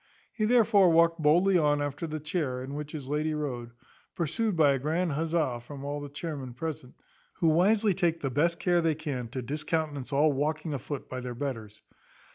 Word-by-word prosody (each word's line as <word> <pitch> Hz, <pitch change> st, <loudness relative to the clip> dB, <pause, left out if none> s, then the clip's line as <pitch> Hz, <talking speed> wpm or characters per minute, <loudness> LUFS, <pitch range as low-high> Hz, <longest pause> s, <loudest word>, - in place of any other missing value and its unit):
He 215 Hz, -, 0 dB
therefore 215 Hz, -5 st, +5 dB
walked 165 Hz, 0 st, +4 dB
boldly 175 Hz, +5 st, +4 dB
on 145 Hz, -2 st, +2 dB
after 145 Hz, +3 st, -3 dB
the 155 Hz, 0 st, -4 dB
chair 150 Hz, -5 st, -2 dB
in 135 Hz, +2 st, -7 dB
which 150 Hz, 0 st, -5 dB
his 145 Hz, -4 st, -6 dB
lady 155 Hz, +2 st, -1 dB
rode, 125 Hz, -6 st, -4 dB, 0.5 s
pursued 190 Hz, +4 st, -1 dB
by 150 Hz, -3 st, +5 dB
a 135 Hz, -, 0 dB
grand 160 Hz, +5 st, 0 dB
huzza, 155 Hz, -4 st, 0 dB
from 140 Hz, +3 st, -9 dB
all 145 Hz, +1 st, -3 dB
the 145 Hz, -, -7 dB
chairmen 140 Hz, -4 st, -6 dB
present, 140 Hz, -3 st, -6 dB, 0.4 s
who 165 Hz, -, +2 dB
wisely 200 Hz, +6 st, +3 dB
take 170 Hz, -2 st, 0 dB
the 135 Hz, -4 st, -2 dB
best 165 Hz, +6 st, +2 dB
care 175 Hz, -1 st, +2 dB
they 165 Hz, -2 st, +1 dB
can 145 Hz, -6 st, -4 dB
to 125 Hz, +2 st, -5 dB
discountenance 150 Hz, 0 st, -2 dB
all 145 Hz, +2 st, +3 dB
walking 155 Hz, +3 st, -1 dB
afoot 140 Hz, +1 st, -5 dB
by 130 Hz, -, -5 dB
their 125 Hz, -1 st, -6 dB
betters. 115 Hz, -6 st, -5 dB
150 Hz, 190 wpm, -28 LUFS, 140-165 Hz, 0.5 s, therefore